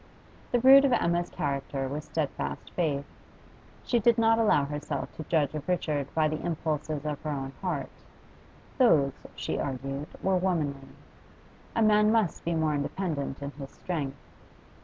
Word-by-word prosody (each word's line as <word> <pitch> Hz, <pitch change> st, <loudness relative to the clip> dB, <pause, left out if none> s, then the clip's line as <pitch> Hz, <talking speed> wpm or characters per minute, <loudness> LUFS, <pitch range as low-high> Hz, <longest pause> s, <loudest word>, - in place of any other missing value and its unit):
The 245 Hz, -, +3 dB
root 270 Hz, +3 st, +8 dB
of 275 Hz, -3 st, +3 dB
Emma's 175 Hz, -5 st, +1 dB
character 140 Hz, -1 st, -2 dB
was 145 Hz, +3 st, -5 dB
steadfast 155 Hz, -4 st, -3 dB
faith. 145 Hz, -5 st, -1 dB, 0.8 s
She 240 Hz, -, +1 dB
did 235 Hz, +1 st, +4 dB
not 225 Hz, 0 st, +4 dB
allow 205 Hz, -10 st, +4 dB
herself 150 Hz, +1 st, -4 dB
to 155 Hz, -, -6 dB
judge 150 Hz, -4 st, +1 dB
of 150 Hz, -2 st, -5 dB
Richard 150 Hz, -6 st, 0 dB
by 155 Hz, -1 st, +3 dB
the 155 Hz, 0 st, -3 dB
impulses 155 Hz, -3 st, -2 dB
of 150 Hz, -2 st, -3 dB
her 155 Hz, -, -4 dB
own 135 Hz, -2 st, -3 dB
heart; 175 Hz, -8 st, -2 dB, 0.9 s
those, 145 Hz, -, +5 dB, 0.2 s
she -, -, -3 dB
argued, 135 Hz, +2 st, -3 dB, 0.2 s
were 190 Hz, -1 st, +3 dB
womanly; 150 Hz, -7 st, -1 dB, 0.9 s
a 230 Hz, -, +3 dB
man 210 Hz, 0 st, +5 dB
must 220 Hz, -7 st, +1 dB
be 170 Hz, 0 st, -1 dB
more 160 Hz, -1 st, +1 dB
independent 145 Hz, -2 st, -3 dB
in 140 Hz, -, -4 dB
his 140 Hz, -2 st, -9 dB
strength. 145 Hz, -7 st, -4 dB
155 Hz, 155 wpm, -28 LUFS, 140-185 Hz, 0.9 s, root